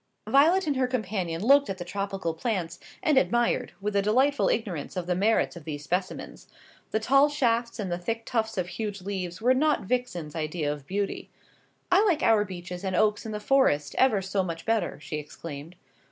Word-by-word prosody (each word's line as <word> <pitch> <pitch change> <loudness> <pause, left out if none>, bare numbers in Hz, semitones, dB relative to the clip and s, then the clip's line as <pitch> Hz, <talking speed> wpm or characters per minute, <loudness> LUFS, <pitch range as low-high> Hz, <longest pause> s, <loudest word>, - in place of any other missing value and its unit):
Violet 330 +8 +4
and 290 -3 0
her 255 -1 +2
companion 195 -8 -2
looked 280 +4 +5
at 195 - -3
the 175 - -6
tropical 195 -2 -3
plants, 175 -2 -3 0.2
and 300 -4 +5
admired, 240 -2 +1
with 205 +1 -3
a 200 - +4
delightful 260 +8 +2
ignorance 190 -7 -2
of 180 - -2
the 180 - 0
merits 205 +4 +2
of 170 - -10
these 145 -1 -6
specimens. 180 +6 -4 0.4
The 220 - 0
tall 275 +6 +4
shafts 235 -5 0
and 200 -5 -3
the 175 - -2
thick 225 +5 -3
tufts 220 -3 -1
of 180 -1 -1
huge 200 0 -5
leaves 185 -1 -4
were 255 +2 +5
not 300 +3 +2
Vixen's 185 -10 -2
idea 155 -1 -2
of 145 -2 -11
beauty. 200 +1 -3 0.6
"I 380 +3 +6
like 350 -8 +2
our 220 -2 +5
beeches 180 -1 -7
and 190 -1 -1
oaks 210 +3 +2
in - - -5
the 210 - -3
Forest 205 - +2
ever 220 -7 +4
so 190 +1 0
much 165 -3 -5
better," 225 -1 0
she 155 - -5
exclaimed. 150 +2 -8
200 Hz, 195 wpm, -27 LUFS, 175-240 Hz, 0.6 s, I